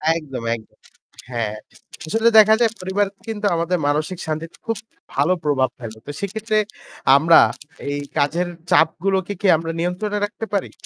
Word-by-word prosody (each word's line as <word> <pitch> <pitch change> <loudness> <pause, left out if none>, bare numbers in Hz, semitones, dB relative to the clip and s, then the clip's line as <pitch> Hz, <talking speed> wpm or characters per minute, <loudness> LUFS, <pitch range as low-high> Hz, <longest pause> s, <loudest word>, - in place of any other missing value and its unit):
একদম, 135 -7 -5
একদম। 110 -1 -14 0.5
হ্যাঁ। 110 -3 -2 0.5
আসলে 225 +7 +3
দেখা 215 +1 +7
যায় 225 -2 +4
পরিবার 190 +2 0 0.2
কিন্তু 215 -2 -4
আমাদের 170 +2 0
মানসিক 155 +5 0
শান্তিতে 160 +1 -4
খুব 225 - -1 0.4
ভালো 150 +7 +3
প্রভাব 130 -3 +2
ফেলে। 110 -2 -8
তো 145 - -3
সেক্ষেত্রে 215 +2 -2 0.6
আমরা 160 +4 +7 0.5
এই 145 0 -2 0.2
কাজের 165 +5 +1 0.2
চাপগুলোকে 190 +4 +2
কি 205 - +2
আমরা 165 +1 -4
নিয়ন্ত্রণে 185 +5 -1
রাখতে 210 +2 -6
পারি? 200 - -1
170 Hz, 145 wpm, -21 LUFS, 145-205 Hz, 0.6 s, দেখা